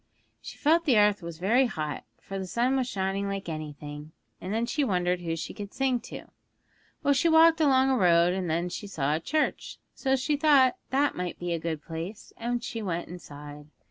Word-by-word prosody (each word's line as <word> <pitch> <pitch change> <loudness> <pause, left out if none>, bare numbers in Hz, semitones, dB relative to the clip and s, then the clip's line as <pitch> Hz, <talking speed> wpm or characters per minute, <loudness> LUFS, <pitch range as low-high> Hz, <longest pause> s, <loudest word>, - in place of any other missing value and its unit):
She - - -9
felt 330 +3 +3
the 260 -8 +4
earth 205 -1 +4
was 170 -1 -7
very 235 +9 +3
hot, 155 -8 -4
for 195 0 -6
the 190 - -5
sun 245 +7 +1
was 260 -2 0
shining 195 +1 -2
like 195 -1 -4
anything, 150 -1 -7 0.3
and 185 - -5
then 225 +2 0
she 285 +5 0
wondered 180 -6 0
who 165 -1 -2
she 165 - -5
could 205 -2 -8
sing 265 -2 +1
to. 235 - -9 0.8
Well, 285 - +4
she 335 +4 +2
walked 325 0 +6
along 265 -2 +4
a - - +3
road, 175 -2 +4
and 185 -2 -2
then 170 +3 0
she 205 +3 -6
saw 150 -7 -1
a 155 - 0
church, 305 - -1 0.2
so 265 -1 +1
she 285 +3 0
thought 280 -4 +5
that 280 +2 +1
must 180 -1 -4
be 175 -1 -3
a 165 - -2
good 160 -2 -4
place, 170 +6 -7
and 240 +1 -2
she 225 - -4
went 175 -4 -3
inside. 150 -4 -10
195 Hz, 205 wpm, -27 LUFS, 170-260 Hz, 0.8 s, walked